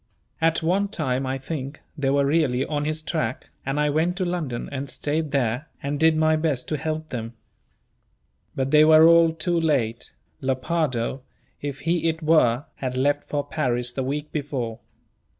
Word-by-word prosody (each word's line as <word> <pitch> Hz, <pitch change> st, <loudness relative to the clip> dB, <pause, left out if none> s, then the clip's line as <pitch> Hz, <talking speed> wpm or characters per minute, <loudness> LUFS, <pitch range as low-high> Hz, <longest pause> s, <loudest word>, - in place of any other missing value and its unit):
At 165 Hz, 0 st, +2 dB
one 190 Hz, +5 st, +2 dB
time, 135 Hz, -8 st, -1 dB
I 130 Hz, +1 st, -1 dB
think, 140 Hz, 0 st, -5 dB, 0.2 s
they 140 Hz, -2 st, 0 dB
were 140 Hz, 0 st, +3 dB
really 140 Hz, -4 st, +2 dB
on 145 Hz, -1 st, -2 dB
his 155 Hz, +1 st, -2 dB
track, 155 Hz, -5 st, -3 dB
and 135 Hz, +2 st, -2 dB
I 150 Hz, 0 st, +2 dB
went 165 Hz, +4 st, +1 dB
to 185 Hz, -, 0 dB
London, 160 Hz, -9 st, -3 dB
and 140 Hz, 0 st, -4 dB
stayed 150 Hz, +3 st, -2 dB
there, 130 Hz, +1 st, 0 dB, 0.2 s
and 140 Hz, +1 st, -2 dB
did 160 Hz, 0 st, +4 dB
my 155 Hz, 0 st, +3 dB
best 155 Hz, -5 st, -1 dB
to 155 Hz, -, 0 dB
help 155 Hz, +1 st, -3 dB
them. 115 Hz, -1 st, -5 dB, 1.2 s
But 135 Hz, 0 st, -1 dB
they 150 Hz, 0 st, +7 dB
were 155 Hz, +1 st, +8 dB
all 170 Hz, -1 st, +6 dB
too 165 Hz, +2 st, -1 dB
late; 130 Hz, -8 st, 0 dB, 0.3 s
Lepardo, 130 Hz, -2 st, -1 dB, 0.4 s
if 140 Hz, -1 st, -5 dB
he 165 Hz, 0 st, +1 dB
it 160 Hz, 0 st, -4 dB
were, 145 Hz, -5 st, +3 dB
had 130 Hz, -1 st, -3 dB
left 145 Hz, +2 st, +1 dB
for 145 Hz, -1 st, -1 dB
Paris 125 Hz, -5 st, -1 dB
the 135 Hz, -, -2 dB
week 145 Hz, +3 st, -3 dB
before. 135 Hz, -7 st, -3 dB
145 Hz, 170 wpm, -24 LUFS, 130-160 Hz, 1.2 s, were